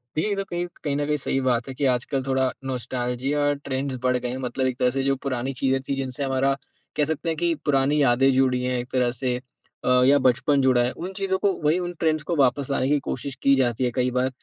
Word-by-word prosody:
देखिए 160 +7 0
ये 205 - 0
तो 195 - -2
कहीं 175 -1 -3 0.2
कहीं 145 -2 -1
न 145 - 0
कहीं 150 0 0
सही 135 -1 -1
बात 125 -2 0
है - - -5
कि 140 +2 -2
आजकल 130 +1 0
थोड़ा 130 -1 +1
नॉस्टैल्जिया 130 +3 -1
ट्रेंड्स 135 0 -2
बढ़ 125 0 +2
गए 125 0 -3
हैं। 125 - -4
मतलब 130 0 -2
एक 130 -1 -2
तरह 125 - +3
से 135 +1 -1
जो 135 0 +2
पुरानी 130 0 -2
चीज़ें 135 +1 0
थीं 140 - 0
जिनसे 135 +1 -3
हमारा 135 0 +1 0.4
कह 150 - +3
सकते 160 +2 -2
हैं 160 - 0
कि 170 0 +2
पुरानी 145 +1 +2
यादें 135 0 +4
जुड़ी 130 -1 +2
हैं 125 0 0
एक 120 - -5
तरह 125 -2 +2
से 125 -2 0 0.5
अ, 125 0 +4
या 140 +2 +6
बचपन 135 +3 +2
जुड़ा 130 -2 +4
है 120 - 0
उन 180 +9 -7
चीज़ों 190 -1 0
को 200 0 +2
वही, 155 +4 +3
उन 175 -1 -4
ट्रेंड्स 155 -2 +1
को - - +2
वापस 140 -1 +2
लाने 130 -1 +1
की 145 0 +3
कोशिश 135 +1 -4
की 140 0 +5
जाती 125 -2 +1
है 125 - 0
कई 125 -1 +1
बार। 125 +1 +1
135 Hz, 250 wpm, -24 LUFS, 125-145 Hz, 0.5 s, या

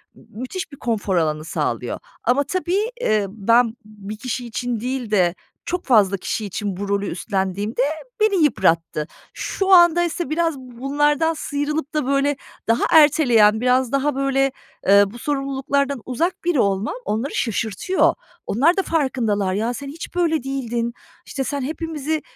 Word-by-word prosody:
m - - -18
müthiş 260 - -6
bir 280 - -11
konfor 215 -6 -1
alanı 155 -2 0
sağlıyor - - -2 0.2
ama 260 +3 +3
tabii, 370 - -1
ııı, 215 -2 +2
ben 230 +3 +2
bir 210 0 -9
kişi 250 +1 -4
için 240 0 -3
değil 250 -1 -3
de 180 -4 +3 0.3
çok 360 0 -3
fazla 205 -6 +4
kişi 215 +3 -3
için 200 -1 -4
bu 200 +1 -4
rolü 200 0 0
üstlendiğimde 195 +4 -2 0.4
beni 410 -6 +3
yıprattı. 165 - +1 0.3
Şu 390 -1 -2
andaysa 345 -1 +5
biraz 325 -1 0
bunlardan 285 +5 0
sıyrılıp 295 0 -3
da, 305 -3 0
böyle, 275 +1 +1 0.3
daha 230 +1 +2
erteleyen, 245 -9 +5
biraz 250 0 +2
daha, 275 +1 +1
böyle, 270 0 +1 0.4
ııı, 200 0 +6
bu 240 - -10
sorumluluklardan 275 -1 -1
uzak 330 +9 -2
biri 345 -6 +2
olmam 200 - +1
onları 225 +7 -2
şaşırtıyor. 230 - +1 0.3
Onlar 300 - +3
da - - +4
farkındalar. 230 - 0
"Ya, 225 +5 -1
sen 275 +4 -7
hiç 315 +5 -8
böyle 325 -5 +1
değildin, 240 -3 -2 0.3
işte, 270 - -3
sen 285 +1 -3
hepimizi 310 +1 -3
260 Hz, 150 wpm, -21 LUFS, 215-300 Hz, 0.4 s, ııı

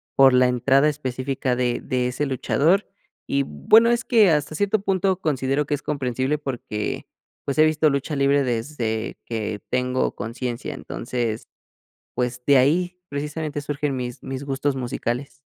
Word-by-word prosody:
por 135 -1 +7
la 125 0 +5
entrada 135 +4 +3
específica 130 -2 -2
de 125 -1 0
de 125 -1 -1
ese 125 +4 -2
luchador 150 - +1 0.4
y, 140 0 +2
bueno, 220 - +4
es 235 -1 +1
que 215 -7 +5
hasta 150 0 0
cierto 205 +4 +1
punto 190 -1 0
considero 140 -2 0
que 145 - -2
es 145 - -2
comprensible 130 0 -1
porque, 125 -7 -4 0.4
pues, 140 - -2
he 155 - +7
visto 155 0 +3
lucha 140 +2 -2
libre 140 0 +3
desde 115 -2 -2
que 110 -2 -3
tengo 125 0 0
conciencia. 120 +5 -4
Entonces, 120 -4 -4 0.7
pues, 125 0 -2
de 140 -1 +6
ahí 175 +7 +2
precisamente 150 +1 -4
surgen 145 -1 -2
mis 125 0 -5
mis 135 +1 -5
gustos 140 0 -1
musicales. 125 +1 -3
135 Hz, 150 wpm, -23 LUFS, 125-150 Hz, 0.7 s, por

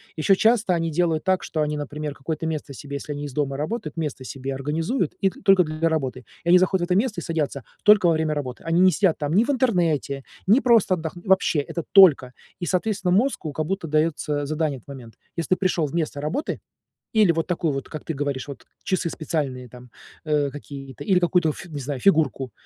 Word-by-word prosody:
Ещё 165 +5 +3
часто 220 -3 +3
они 165 -1 -1
делают 165 0 0
так, 190 -1 +1
что 155 - -2
они, 150 0 0
например, 150 0 -5
какое-то 160 +3 -4
место 150 -3 -4
себе, 140 +2 -8
если 145 +1 -6
они 145 0 -4
из 140 - -7
дома 140 -2 -1
работают, 160 0 -4
место 150 -5 -3
себе 135 +1 -5
организуют 160 - -1
и 195 - +3
т - - -16
только 195 -2 +5
для 155 +1 -1
работы. 130 -5 -2 0.2
И - - 0
они 180 - +8
заходят 185 -1 +2
в - - -7
это 180 - +4
место 215 +1 +1
и - - -7
садятся 150 -6 -2 0.2
только 210 -4 +6
во 165 - +4
время 155 -1 0
работы. 130 -4 -5
Они 165 +1 +1
не 185 0 +6
сидят 190 -3 +2
там 150 +1 -2
ни 210 - +5
в 260 - -5
интернете, 170 - +1 0.2
ни 230 +7 +5
просто 230 -6 +4
отдох 160 -3 -3
вообще, 180 -3 +2
это 165 +3 -4
только. 160 -10 +7 0.3
И, - - -1
соответственно, 190 +1 0
мозгу 200 - +1
как 155 +2 -3
будто 190 -1 -3
даётся 150 -1 0
задание 155 -1 -1
в - - -25
этот - - -41
момент. 125 -6 -10 0.2
Если 165 - -3
ты 185 - +3
пришёл 180 -4 +1
вместо 150 -1 -3
работы 155 - -3 0.6
или 210 -6 +5
вот 165 0 -1
такую 165 -4 -1
вот, 135 - -5
как 155 - -8
ты 160 - -3
говоришь, 140 -1 -3
вот 140 - -9 0.2
часы 185 -3 -1
специальные 135 -6 -3
там, 125 +1 -14 0.3
э, 150 -2 +1
какие-то, 135 -1 -9
или 190 -4 +3
какую-то, 175 -2 +2
ф 165 - -7
не 155 -4 -7
знаю, 135 0 -4
фигурку 145 - +2
160 Hz, 220 wpm, -23 LUFS, 145-180 Hz, 0.6 s, они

